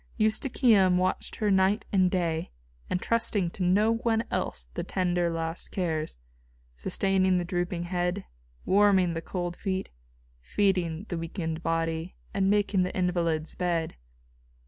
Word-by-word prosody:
Eustochium 215 -4 +3
watched 185 +1 -1
her 210 -2 0
night 190 +3 +3
and 185 -2 +4
day, 170 -3 -1 0.4
entrusting 205 -2 0
to 195 - -9
no 205 +5 +3
one 230 -1 +1
else 60 -1 -2
the - - -3
tender 175 -2 0
last 165 0 -3
cares 160 - -2 0.6
sustaining 190 - +2
the 175 - -1
drooping 175 0 -2
head, 180 +2 -2 0.4
warming 190 -3 +4
the 165 - -3
cold 175 0 -4
feet, 190 -1 -3 0.5
feeding 180 - 0
the 175 - -2
weakened 165 -1 -4
body, 165 +1 -1 0.2
and 195 -1 +2
making 205 -2 +2
the 180 - -1
invalid's 170 -3 0
bed. 170 -3 -1
180 Hz, 130 wpm, -28 LUFS, 170-195 Hz, 0.6 s, and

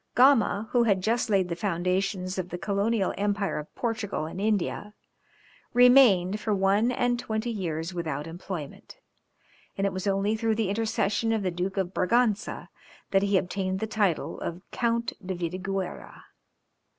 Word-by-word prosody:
Gama, 240 -5 +4
who 245 - +4
had 195 -4 +2
just 230 +2 +1
laid 195 -3 +2
the 170 - -3
foundations 185 +1 -1
of 180 -1 -4
the 175 - -4
colonial 200 +2 0
empire 200 -2 0
of 150 - -10
Portugal 225 -8 -2
in 165 +4 -7
India, 210 0 -1 0.8
remained 240 -7 +6
for 215 -1 0
one 200 +5 +2
and 245 -1 0
twenty 220 0 -2
years 170 -4 -3
without 155 -4 -3
employment, 165 -2 -8 0.8
and 195 - 0
it 195 - 0
was 185 +2 -4
only 200 +2 +1
through 220 0 0
the 215 -3 0
intercession 215 +1 0
of 220 -2 0
the 185 - 0
Duke 180 +3 -3
of 190 -1 -1
Braganza, 225 +2 0 0.4
that 195 - +4
he 200 -1 +2
obtained 190 +1 -2
the 220 - -1
title 210 -6 -1
of 175 +2 -5
Count 235 -1 0
de 185 0 -3
Vidigueyra. 185 +2 -4
195 Hz, 155 wpm, -27 LUFS, 185-220 Hz, 0.8 s, remained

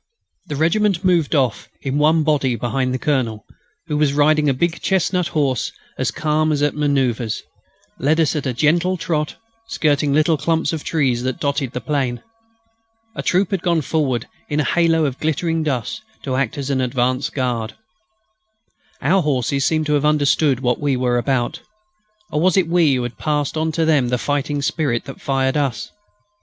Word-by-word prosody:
The 150 - -4
regiment 185 +4 +1
moved 170 -4 +2
off 130 -7 0
in 135 +1 -1
one 155 +1 +4
body 140 -5 +1
behind 125 +3 -1
the 130 - -1
Colonel, 125 -7 -1 0.4
who, 150 0 0
riding 150 0 +3
a - - +4
big 170 +5 -1
chestnut 185 -2 +1
horse 140 -8 0 0.3
and - - -6
as - - +1
calm 155 0 0
as 145 -1 0
at 145 - +2
manoeuvres, 130 -6 0 0.6
led 155 +5 +2
us 160 -1 +2
at 145 -2 -2
a 130 - -1
gentle 170 +8 +2
trot 155 -3 -2 0.3
skirting 150 -7 +1
the - - +2
little 155 +1 +3
clumps 165 +3 0
of 155 - -4
trees 130 -7 0
that 130 0 -3
dotted 140 -3 -1
the 125 - -4
plain. 135 -5 -2 0.9
A - - -3
troop 185 +1 +1
had 195 -4 0
gone 170 -3 +1
forward 135 -6 -1 0.2
in 150 - 0
a - - +3
halo 165 -1 +2
of 135 -2 -3
glittering 160 +1 0
dust 140 - -2 0.2
to 130 -2 -2
act 135 -2 -1
as 140 0 -3
an 130 -1 +1
advance 130 +3 0
guard. 120 -6 -2 1.3
Our 190 +2 +3
horses 140 -2 0
seemed 155 -1 +1
to 150 - 0
have 145 -1 +2
understood 145 -2 +2
what 125 -2 +1
we 140 -3 0
were 125 -1 +1
about. 120 -1 -1 0.7
Or 150 - 0
was 185 +1 +3
it 185 -4 +3
we 165 -5 +3
who 125 - -1
had 120 0 -6
passed 150 -2 -1
on 160 0 0
to 165 +1 +1
them 150 -6 +3
the 125 - +1
fighting 145 +2 -1
spirit 140 -7 -1
that 135 - -10
fired 135 -1 0
us? 135 -7 -1
145 Hz, 185 wpm, -20 LUFS, 130-160 Hz, 1.3 s, one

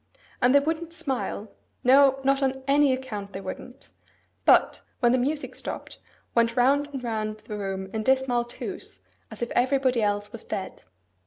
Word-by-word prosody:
And 250 +2 +5
they - - +9
wouldn't 325 +3 -3
smile,—no, 270 -2 +1
not 275 +1 +2
on 265 0 -1
any 285 0 +4
account 215 -7 -4
they 190 - -5
wouldn't; 220 +7 -9 0.6
but, - - +4 0.2
when 240 -2 +4
the 255 - +3
music 290 +4 -2
stopped, - - -6 0.3
went 230 0 +2
round 280 +4 +3
and 270 -3 -6
round 215 -2 -3
the 210 - -7
room 195 -2 -4
in 220 - -1
dismal 260 0 +2
twos, 240 - -8 0.3
as - - -6
if 235 - -4
everybody 255 -1 +2
else 205 0 -1
was 230 - -8
dead. 190 - -6
250 Hz, 160 wpm, -26 LUFS, 220-275 Hz, 0.6 s, they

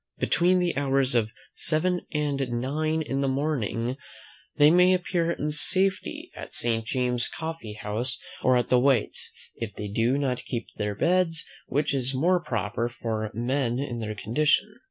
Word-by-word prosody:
Between 180 +2 +3
the 180 -1 +1
hours 135 -1 +2
of 115 -3 +2 0.2
seven 180 +3 0
and 150 -3 -1
nine 155 +6 -1
in 135 -2 -2
the 140 - +1
morning, 130 -3 -1 0.6
they 145 +1 +6
may 180 +2 +6
appear 175 -2 0
in 150 -2 -2
safety 190 +5 0
at - - -8
Saint 115 -1 +1
James's 125 0 +1
coffee 160 -9 -6
house, 110 +4 -3 0.2
or 130 -1 +4
at 120 - -1
White's, 125 -2 +2 0.3
if 110 -4 -5
they 105 - -5
do 115 +6 +1
not 130 -3 -1
keep 120 -3 -3
their 105 -1 -2
beds, 170 - +1 0.2
which 145 +2 0
is 135 -1 -1
more 175 +6 +3
proper 115 -2 -2
for 110 -2 -3
men 120 +1 0
in 130 -3 -3
their 110 -1 -4
condition. 150 - +1
135 Hz, 155 wpm, -26 LUFS, 120-155 Hz, 0.6 s, they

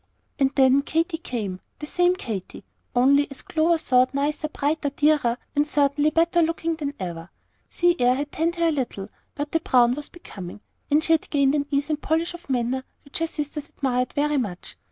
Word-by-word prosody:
And 270 -1 +4
then 265 0 +5
Katy 325 +3 -1
came, 210 - -4 0.2
the 300 - -6
same 355 +3 +2
Katy, 215 - -6 0.3
only, 280 +4 +4
as 275 - -9
Clover 330 +1 +2
thought, 255 -4 +2
nicer, 295 +2 -1
brighter, 295 0 -1
dearer, 290 -4 +2 0.2
and 290 +1 +2
certainly 290 0 +2
better 335 +2 +3
looking 330 0 0
than 290 -3 -4
ever. 170 -2 -6 0.4
Sea 350 0 +2
air 245 +1 +4
had 285 +2 -4
tanned 335 +2 0
her 335 -1 +2
a - - +2
little, 240 -8 -3 0.3
but 290 0 -4
the 325 - +2
brown 245 -6 +4
was 290 +2 -6
becoming; 205 - -10 0.3
and 300 +2 +3
she 325 - +3
had 320 - 0
gained 280 -2 +3
an 285 -1 0
ease 285 +2 0
and 300 -1 -2
polish 325 +2 0
of 345 -3 -12
manner 255 +1 0 0.2
which 280 - -3
her 330 - 0
sisters 295 -1 -5
admired 250 -2 -1
very 295 0 +1
much. 200 -9 -4
290 Hz, 195 wpm, -24 LUFS, 255-320 Hz, 0.4 s, then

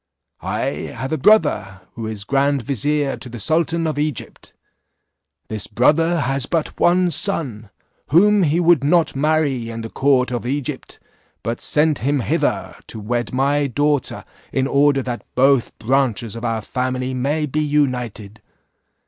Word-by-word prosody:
I - - -2 0.3
have 130 +3 -4
a 155 - 0
brother, 100 - +3
who 115 -1 -6
is 110 -2 -4
grand 140 +3 +1
vizier 140 +3 -1
to 125 - -9
the 120 - -8
sultan 165 +7 0
of 155 -2 -2
Egypt. 150 -6 -4 1.0
This 110 -3 -5
brother 165 +9 +2
has 135 0 -1
but 165 -3 -2
one 180 0 +3
son, 140 - -1 0.4
whom 205 +7 +4
he 165 -1 +2
would 170 -4 +4
not 165 +1 +2
marry 140 -5 0
in 115 0 -5
the 115 - -7
court 130 -2 +2
of 120 0 -3
Egypt, 140 0 -4 0.5
but 115 +3 -3
sent 150 -1 +1
him 140 +1 0
hither - - -1
to 110 - -7
wed 120 +3 -2
my 140 +2 +1
daughter 145 +1 -1 0.3
in 130 - 0
order 140 0 +3
that 120 -1 -5
both 135 -1 +3
branches 120 -2 0
of 115 - -7
our 115 -2 -1
family 130 +3 -2
may 145 +5 0
be 150 +2 -1
united. 125 -8 -1
135 Hz, 150 wpm, -20 LUFS, 120-150 Hz, 1.0 s, whom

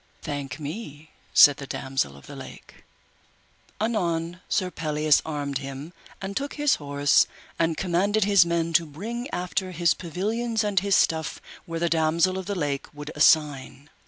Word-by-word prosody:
Thank 140 -3 -5
me, 155 -1 -7 0.2
said 145 -1 +8
the 140 - -8
Damosel 130 - -2
of 70 - -15
the - - -10
Lake. - - -12 0.9
Anon 175 -6 -1
Sir 185 -2 0
Pelleas 150 -2 +2
armed 145 -3 -3
him, 140 +4 -7 0.3
and 195 0 -5
took 280 +4 -3
his 295 -1 +2
horse, 145 0 +3 0.3
and 165 -1 +1
commanded 195 +4 +1
his 200 -2 +6
men 170 -1 -1
to 165 0 +3
bring 225 - -6
after 180 +1 -2
his 170 -1 +2
pavilions 220 +7 -2
and 205 -2 +2
his 200 -1 +2
stuff 160 -2 +1 0.3
where 165 -1 -4
the 170 - +1
Damosel 165 +3 +2
of 190 - -7
the 200 - -2
Lake 145 -5 -2
would 145 +1 -7
assign. 145 -2 +2
165 Hz, 160 wpm, -25 LUFS, 145-190 Hz, 0.9 s, said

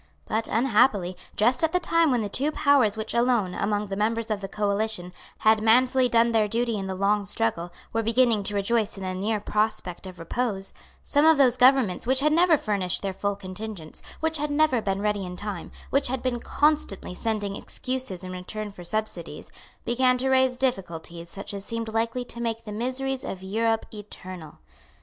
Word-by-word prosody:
But, 225 +1 -1
unhappily, 210 -6 +2 0.2
just 245 +7 +3
at 320 - +2
the 360 - +3
time 335 -2 +3
when 245 -3 +2
the - - -2
two 275 +9 0
powers 280 -9 +3
which 220 0 -3
alone, 235 -6 +2
among 205 +2 -1
the 195 -1 -4
members 225 +2 -1
of 205 -2 -1
the 195 - -4
coalition, 200 -2 -2 0.2
had 220 0 +4
manfully 250 +3 +4
done 235 0 +4
their 220 -2 +3
duty 230 +2 0
in 195 -2 -3
the 190 - -3
long 200 +2 +1
struggle, 170 - -1 0.2
were 225 - +1
beginning 230 -1 +3
to 205 - -1
rejoice 215 +1 0
in 195 - -6
the 185 0 -3
near 210 +3 -1
prospect 210 -3 -2
of 185 -1 -10
repose, 195 +3 -2 0.3
some 290 0 +3
of 320 -1 +6
those 255 -4 +5
governments 250 -6 +4
which 260 +1 +4
had 300 +1 +3
never 335 -1 +5
furnished 200 -7 -1
their 195 -1 -2
full 200 +1 -2
contingents, 190 -3 -7 0.2
which 320 0 +2
had 300 0 -1
never 290 -4 +2
been 195 -1 -2
ready 210 -2 0
in 180 -1 -7
time, 200 -3 -6 0.2
which 275 +1 +3
had 260 0 -2
been 250 -2 -1
constantly 295 -11 0
sending 205 0 -2
excuses 255 -9 -4
in 185 - -6
return 205 +4 -6
for 180 -3 -11
subsidies, 175 -5 -3 0.3
began 255 +1 +3
to 265 +1 0
raise 260 -1 +3
difficulties 170 -9 -3
such 200 +3 -5
as 200 -1 -4
seemed 230 0 -4
likely 230 +2 -1
to 235 -1 -8
make 230 -1 -2
the 215 - -8
miseries 260 +4 -2
of 190 -1 -6
Europe 225 +3 0
eternal. 185 -6 -9
220 Hz, 190 wpm, -26 LUFS, 195-250 Hz, 0.3 s, of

